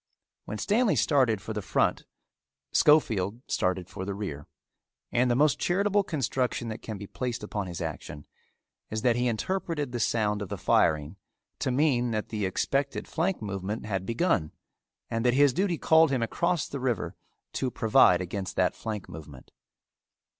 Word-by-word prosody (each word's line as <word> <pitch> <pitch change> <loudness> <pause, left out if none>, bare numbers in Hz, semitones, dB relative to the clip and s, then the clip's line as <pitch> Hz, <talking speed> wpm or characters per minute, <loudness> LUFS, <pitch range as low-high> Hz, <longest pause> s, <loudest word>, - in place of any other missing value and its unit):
When 110 - -5
Stanley 210 - +2
started 125 -9 +2
for 110 - -5
the 105 - -3
front - - 0 0.7
Schofield 115 -7 +3
started 90 -2 0
for 95 - -7
the 100 0 -4
rear, 75 -9 -5 0.6
and 125 +1 +2
the 120 - +3
most 145 +2 +3
charitable 200 +3 +2
construction 130 - -1
that 110 - -6
can 110 -2 -6
be 100 - -7
placed 120 +2 -4
upon 105 -2 -3
his 85 -1 -6
action 75 -2 -6 0.6
is 110 0 -3
that 120 -2 +4
he 125 +1 +1
interpreted 150 - -2
the 120 - -3
sound 105 -2 +1
of 100 - -5
the - - -4
firing 75 +2 +2 0.4
to - - -1
mean 125 -2 +2
that 110 -2 -2
the 105 -3 -1
expected 140 +8 -1
flank 175 - -1
movement 100 +2 -4
had 95 -3 -2
begun 115 - 0 0.6
and 115 0 -1
that 125 0 +3
his 140 -1 +5
duty 180 +1 0
called 160 0 +5
him 130 -4 0
across 170 +7 0
the 140 - -5
river 125 -5 -2 0.4
to 130 - -1
provide 105 -7 +4
against 95 +1 -4
that - - +2
flank 105 -4 -5
movement. 75 -5 -11
115 Hz, 165 wpm, -28 LUFS, 100-140 Hz, 0.7 s, his